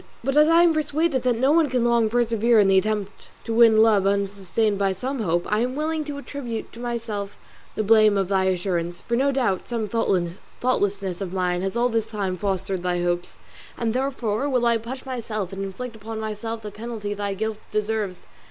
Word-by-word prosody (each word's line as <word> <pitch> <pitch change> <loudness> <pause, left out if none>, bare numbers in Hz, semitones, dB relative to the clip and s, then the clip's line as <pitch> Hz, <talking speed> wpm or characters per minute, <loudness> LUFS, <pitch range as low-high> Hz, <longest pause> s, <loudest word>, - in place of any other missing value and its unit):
But 270 +2 -1
as 300 +1 +6
I 335 +1 +6
am 340 -2 +5
persuaded 310 -2 0
that 245 -2 +1
no 265 +4 +3
one 320 -2 +4
can 250 -2 +1
long 235 -2 +3
persevere 230 0 +2
in 200 - +5
the 190 0 +5
attempt 210 0 -4
to 230 - -3
win 225 -1 +6
love 205 -4 +4
unsustained 200 +1 0
by 195 -1 +2
some 260 +7 -4
hope, 175 -4 0
I 210 - +3
am 250 +2 -1
willing 310 +1 -1
to 290 -1 -5
attribute 260 -5 -6
to 230 - -11
myself 230 -4 -4 0.4
the 215 - 0
blame 215 -1 +5
of 195 -2 +1
thy 190 -1 +1
assurance, 175 -2 -1
for 235 - -2
no 275 +3 +2
doubt 240 -9 0
some 230 -3 -2
thoughtlessness 195 0 -1
of 185 -2 -4
mine 180 -1 0
has 195 +4 -2
all 245 +1 +2
this 225 -1 -1
time 200 -4 -2
fostered 190 -1 -2
thy 175 -1 -1
hopes; 175 0 -2 0.4
and 230 -2 -1
therefore 255 -1 -1
will 250 -3 +1
I 235 -1 +3
punish 255 +4 -7
myself 220 -7 -4
and 195 0 -4
inflict 230 +5 -6
upon 220 +1 -7
myself 220 +1 -4
the 210 - -6
penalty 215 -1 -5
thy 200 -1 -3
guilt 220 +1 -3
deserves. 215 -3 -2
220 Hz, 200 wpm, -24 LUFS, 195-240 Hz, 0.4 s, as